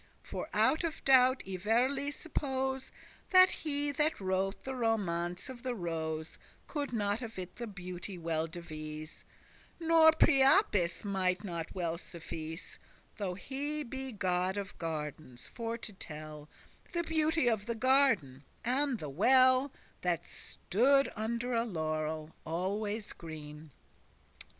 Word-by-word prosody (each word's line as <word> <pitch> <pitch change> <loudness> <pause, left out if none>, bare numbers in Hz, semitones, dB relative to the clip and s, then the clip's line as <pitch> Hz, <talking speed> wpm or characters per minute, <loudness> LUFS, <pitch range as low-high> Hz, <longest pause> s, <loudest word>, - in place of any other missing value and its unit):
For - - -5
out 315 - +3
of 330 -1 -4
doubt 260 -1 +6
I 190 -1 -3
verily 250 +8 +2
suppose 265 -3 -3 0.4
That 370 0 +8
he 290 -1 +1
that 300 +2 +1
wrote 190 +1 -1
the 265 - -4
Romance 185 -8 -1
of 255 -2 -9
the 250 -1 -2
Rose 160 -4 -4 0.3
<22> - - -15
Could 290 -4 -2
not 205 -1 0
of 230 -3 -7
it 185 -1 -7
the 235 - -5
beauty 180 -1 -7
well 165 -1 -1
devise;* 155 -2 -8 0.5
*describe 330 - -6
Nor 320 -1 +8
Priapus 270 - +4
<23> 200 - -3
mighte 185 0 +1
not 170 -4 -5
well 170 -2 -2
suffice, 165 -1 -8 0.4
Though 190 -4 -2
he 285 +9 -3
be 265 +1 -5
god 185 -2 0
of 200 -1 -5
gardens, 150 -5 -5
for 230 -1 -3
to 220 -2 -6
tell 155 -4 -9 0.4
The 345 -1 0
beauty 320 -3 +1
of 220 -2 +1
the 235 - -1
garden, 225 - +3 0.2
and 265 +1 +1
the 155 - -6
well* 255 - +5
*fountain - - -27 0.2
That 175 -2 0
stood 275 +7 +1
under 235 +3 -2
a 230 0 +2
laurel 155 -5 -3
always 205 +6 -2
green. 155 -1 -9
205 Hz, 140 wpm, -32 LUFS, 170-265 Hz, 0.5 s, That